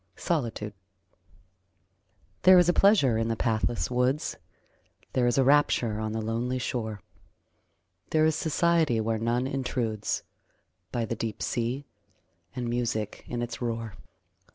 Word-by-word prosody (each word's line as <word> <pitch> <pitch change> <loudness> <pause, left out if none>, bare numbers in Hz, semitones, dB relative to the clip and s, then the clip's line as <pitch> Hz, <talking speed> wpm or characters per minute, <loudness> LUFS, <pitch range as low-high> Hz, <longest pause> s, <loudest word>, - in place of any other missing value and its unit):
SOLITUDE 115 - -2 1.7
There 185 0 +8
is 175 -1 +5
a 175 - +4
pleasure 160 - +4
in 115 - 0
the 115 - 0
pathless 115 +2 0
woods, 125 +4 0 0.8
There 125 -1 +2
is 120 - +1
a 135 - +5
rapture 125 -6 +3
on 110 0 -2
the 110 0 -3
lonely 120 +3 -1
shore, 110 -5 -3 1.1
There 155 0 +3
is 160 -1 +2
society 160 -5 +2
where 110 0 0
none 120 +3 0
intrudes 125 -5 -2 0.7
By 120 -2 -1
the 115 - -3
deep 110 -1 -4
sea, 125 +4 -2 0.7
and 125 -2 -3
music 120 -3 -2
in 120 0 -3
its 120 +1 -6
roar. 115 -3 -3
120 Hz, 130 wpm, -27 LUFS, 115-135 Hz, 1.7 s, There